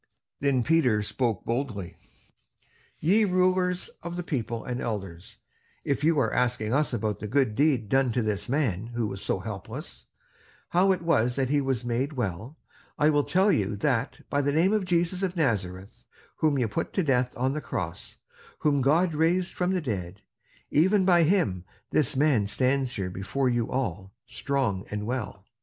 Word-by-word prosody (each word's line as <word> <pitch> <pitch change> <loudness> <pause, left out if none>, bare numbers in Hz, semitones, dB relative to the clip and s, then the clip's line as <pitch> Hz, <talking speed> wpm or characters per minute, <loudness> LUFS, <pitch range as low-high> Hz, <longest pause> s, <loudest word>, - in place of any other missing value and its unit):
Then 135 -3 +2
Peter 125 -9 +3
spoke 115 -1 -2
boldly: 115 -7 -3 1.0
"Ye 200 +8 +3
rulers 185 -1 +1
of 170 +1 -6
the 175 - -3
people 120 -7 -3
and 125 0 -3
elders, 95 -6 -5 0.5
if 140 0 -1
you 160 0 +3
are - - +1
asking 120 -3 0
us 150 +2 +2
about 110 -3 -2
the 105 - -5
good 130 -1 +1
deed 135 -3 +2
done 135 +2 +2
to 120 - 0
this 105 0 -2
man 120 -8 0
who 120 -2 0
was 100 -2 -5
so - - 0
helpless, - - -8 0.6
how 185 +3 +4
it 185 -2 -1
was 125 -8 +2
that 135 -2 0
he 145 -1 +3
was 130 -4 -1
made 125 +5 -1
well, 115 - -4 0.4
I 150 +1 +4
will 145 -1 +2
tell 190 +6 +3
you 105 - 0
that 125 +3 -1
by 145 - 0
the 145 0 +1
name 170 +7 +3
of 210 -3 +1
Jesus 175 +1 +1
of 190 -2 -1
Nazareth 100 - -2 0.3
whom 155 -3 +2
you 125 -3 +1
put 105 - -3
to 190 - +1
death 125 -4 +1
on 130 +2 0
the 150 - -3
cross, - - -5 0.4
whom 145 -2 +1
God 160 +6 +3
raised 170 +4 +1
from 180 0 0
the 185 -1 0
dead; 100 - -5 0.5
even 190 +6 +3
by 175 -2 +5
him 160 - +2 0.3
this 145 -4 +2
man 135 -7 +3
stands 130 +3 +1
here 95 -3 -3
before 105 +8 -1
you 120 -2 0
all 100 -7 -3
strong 125 -6 -1
and 105 0 -4
well. 110 -5 -4
130 Hz, 175 wpm, -27 LUFS, 110-160 Hz, 1.0 s, by